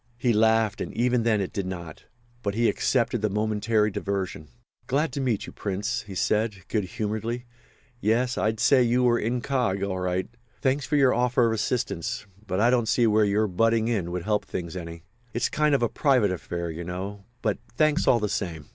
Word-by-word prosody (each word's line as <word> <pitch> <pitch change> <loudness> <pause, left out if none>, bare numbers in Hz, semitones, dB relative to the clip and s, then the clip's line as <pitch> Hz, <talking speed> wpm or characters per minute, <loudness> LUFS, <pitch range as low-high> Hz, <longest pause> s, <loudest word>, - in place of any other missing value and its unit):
He 120 -1 +2
laughed, 110 -1 +3
and - - -4
even 125 +1 +2
then 110 -3 +2
it 95 - -4
did 100 -2 -2
not. 85 -4 -7 0.4
But 100 -2 -2
he 115 +1 +3
accepted 120 -2 +1
the 105 - +1
momentary 105 +1 +1
diversion. 95 -6 -3 0.4
"Glad 145 +1 0
to 140 - -2
meet 120 -6 0
you, - - -10
Prince," 105 +5 -2
he 95 - -7
said, 105 -1 0
good 105 -4 0
humouredly. 110 +3 -3 0.5
"Yes, 120 +4 +1
I'd 110 +3 0
say 135 +1 +5
you 125 +1 +3
were 120 -1 +3
incog. 120 -4 0
all 95 -1 -3
right. 90 0 -1 0.3
Thanks 135 +1 0
for 150 - 0
your 135 -3 +5
offer 125 +1 +2
of 115 - +2
assistance—but 105 -3 -3
I 120 +3 +4
don't 120 -3 +2
see 120 -4 +3
where 110 -1 +4
your 105 +2 +2
butting 115 +4 +2
in 100 -7 -1
would 90 0 -3
help 105 +1 0
things 85 -1 -5
any. 85 -2 -7 0.3
It's 120 - +1
a - - -29
kind 150 -1 +3
of 120 -4 0
private 130 -9 +3
affair, 85 -1 -4
you 80 +2 -6
know—but 100 +5 -4 0.2
thanks 155 +2 +2
all 120 - +5
the 105 - 0
same." 85 -8 -4
110 Hz, 190 wpm, -26 LUFS, 95-120 Hz, 0.5 s, say